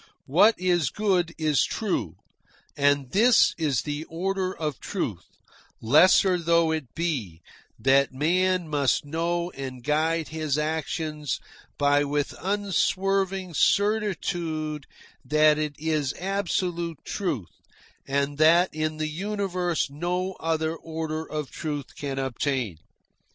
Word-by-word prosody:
What 195 +11 +5
is 175 -6 +2
good 185 -4 +1
is 155 -3 +2
true. - - -2 0.6
And 140 -2 +2
this 230 +4 +5
is 145 -7 +1
the 150 +1 -4
order 185 +3 -2
of 155 -6 -4
truth, - - -4 0.5
lesser 180 - +5
though 170 -1 +3
it 155 -6 -4
be, 120 - -3 0.3
that 135 +1 +3
man 180 +5 +1
must 145 -2 +1
know 170 +3 -1
and 130 -4 -7
guide 160 +3 0
his 155 -2 -1
actions 150 -1 -2 0.4
by 145 0 +3
with 145 0 -1
unswerving 195 -1 0
certitude 175 -8 0 0.4
that 155 0 +4
it 150 -1 -2
is 155 -3 -1
absolute 180 -3 -2
truth 155 - -3 0.6
and 140 +1 -1
that 170 +4 +5
in 155 0 -2
the 155 0 -1
universe 180 -2 -2
no 180 +5 -2
other 160 0 -1
order 160 -1 -4
of 150 -3 -4
truth 145 -4 -5
can 140 -2 -4
obtain. 130 - -2
160 Hz, 115 wpm, -26 LUFS, 145-180 Hz, 0.6 s, What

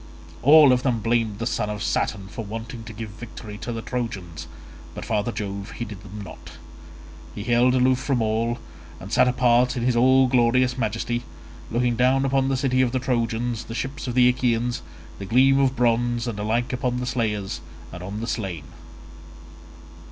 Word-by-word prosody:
All 145 +1 +8
of 125 - +1
them 125 -4 0
blamed 115 -2 0
the 115 - -3
son 110 -3 -1
of 105 0 -4
Saturn 100 -3 -1
for 115 +3 -6
wanting 115 +2 -7
to 115 - -8
give 110 0 -7
victory 105 -1 -9
to 120 - -5
the 115 -1 -5
Trojans, 100 -10 -5 0.5
but - - -6
father 110 +1 -1
Jove 100 -3 -5
heeded 105 -4 -7
them 105 +1 -9
not: - - -11 0.8
he 105 - -5
held 120 +2 +3
aloof 130 0 +3
from 135 -1 0
all, 115 +2 0 0.4
and 95 +2 -9
sat 125 - +5
apart 125 0 +3
in 120 - -2
his 125 0 +2
all 130 +2 +5
glorious 125 0 +3
majesty, 120 0 -2 0.5
looking 120 +1 +1
down 130 +3 +3
upon 135 0 +1
the 135 - +1
city 130 -1 +1
of 125 -2 +1
the 130 - +1
Trojans, 120 -2 -1
the 115 - -7
ships 130 +3 -4
of 125 - -3
the 125 -1 +6
Achaeans, 120 -1 +1 0.4
the 100 - -5
gleam 135 +4 +4
of 135 -1 +2
bronze, 120 0 +1
and 110 -3 -4
alike 115 +4 -1
upon 125 -1 -1
the 125 - -3
slayers 105 -6 -2 0.3
and 90 - -7
on 100 +4 -5
the 115 - -4
slain. 95 -10 -3
120 Hz, 180 wpm, -24 LUFS, 110-125 Hz, 0.8 s, All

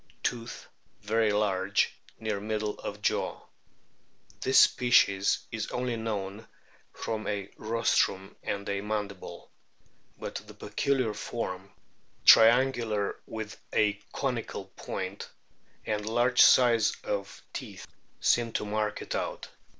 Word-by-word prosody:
Tooth 120 -1 -3 0.4
very 110 +1 +2
large, 100 -1 +1 0.3
near 110 -2 -2
middle 105 0 -3
of 105 0 -7
jaw. - - 0 1.0
This 130 +1 +3
species 120 -6 +4
is 110 -2 -3
only 125 -1 -2
known 105 -1 -4 0.4
from 110 -1 -4
a 100 -2 -3
rostrum 110 -3 0
and 100 0 -4
a 100 -1 -1
mandible. 105 -2 -5 0.7
But - - -5
the - - -12
peculiar 130 -6 0
form 100 -3 -5 0.6
(triangular 115 -3 +5
with 110 -2 -6 0.2
a 105 -1 +3 0.2
conical 125 -7 -3
point) - - -5 0.6
and 105 -1 -1
large 120 +3 +3
size 115 -4 +6
of 100 -1 -4
teeth - - -7 0.3
seem 120 -1 +2
to - - -1
mark 105 0 -2
it - - -5
out. - - -3
110 Hz, 110 wpm, -29 LUFS, 100-115 Hz, 1.0 s, size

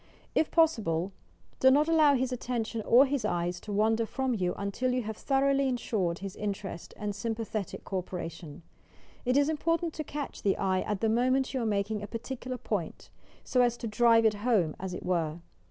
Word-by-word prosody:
If 315 - +2
possible, 200 - +2 0.5
do 260 - +6
not 290 +4 +4
allow 310 -3 +5
his 260 0 0
attention 235 -2 -3
or 255 +4 +7
his 275 -3 -1
eyes 175 -3 -1
to 210 - -8
wander 220 +2 +2
from 265 +1 -1
you 180 -5 -1
until 200 +6 -1
you 250 -1 0
have 220 0 -4
thoroughly 275 +2 +2
insured 210 -9 -1
his 195 - -6
interest 195 -4 -5
and 210 -1 -3
sympathetic 220 -1 -4
co 190 - -2
operation. 170 -3 -7 0.6
It 250 +2 +3
is 285 0 +4
im 315 -1 0
portant 330 +1 0
to 310 - -4
eatch 290 -1 -6
the 200 -2 +1
eye 185 -1 +1
at 205 -2 -3
the 225 - +2
moment 255 +4 +2
you 260 - -1
are 230 - 0
making 205 0 -1
a 205 - -5
particular 255 +2 -5
point, 200 -8 -4 0.3
so 250 - +2
as 240 -1 +2
to - - -6
"drive 230 +1 +4
it 220 - +5
home" 205 -10 +2
as 185 -1 -4
it - - -7
were. 165 -3 0
225 Hz, 195 wpm, -29 LUFS, 195-260 Hz, 0.6 s, or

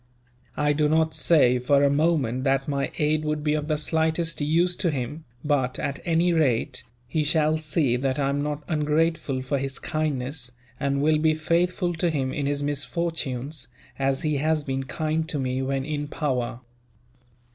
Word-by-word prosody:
I 150 0 +2
do 150 0 +2
not 160 0 +2
say, 135 -4 +4
for 140 +3 +3
a 140 - +5
moment, 140 -5 +1
that 135 0 +1
my 140 -1 -1
aid 155 +1 +1
would 150 -1 -1
be 150 -1 +2
of 150 -1 -1
the 155 -1 +1
slightest 160 +1 0
use 170 +4 +2
to 180 - +1
him 145 +2 -4 0.2
but, 135 -4 +1
at 140 - -3
any 170 +1 +3
rate, 140 -8 +1 0.3
he 155 +5 0
shall 155 +1 +2
see 150 -5 +1
that 135 +1 -1
I 140 -1 +1
am 140 +1 0
not 150 0 -3
ungrateful 150 -3 0
for 135 +1 -1
his 135 0 -3
kindness; 140 -4 -3 0.3
and 140 0 0
will 155 0 +3
be 155 0 +3
faithful 175 +2 +1
to 170 +1 0
him 135 -4 -1
in 145 -2 -1
his 145 0 -1
misfortunes, 145 -2 -2 0.3
as 135 0 0
he 150 -2 +1
has 155 +1 +1
been 135 -1 -3
kind 155 +2 -2
to 150 - -1
me, 130 -1 -1
when 135 0 -1
in 145 -1 -3
power." 125 -5 -2
150 Hz, 180 wpm, -25 LUFS, 135-155 Hz, 0.3 s, a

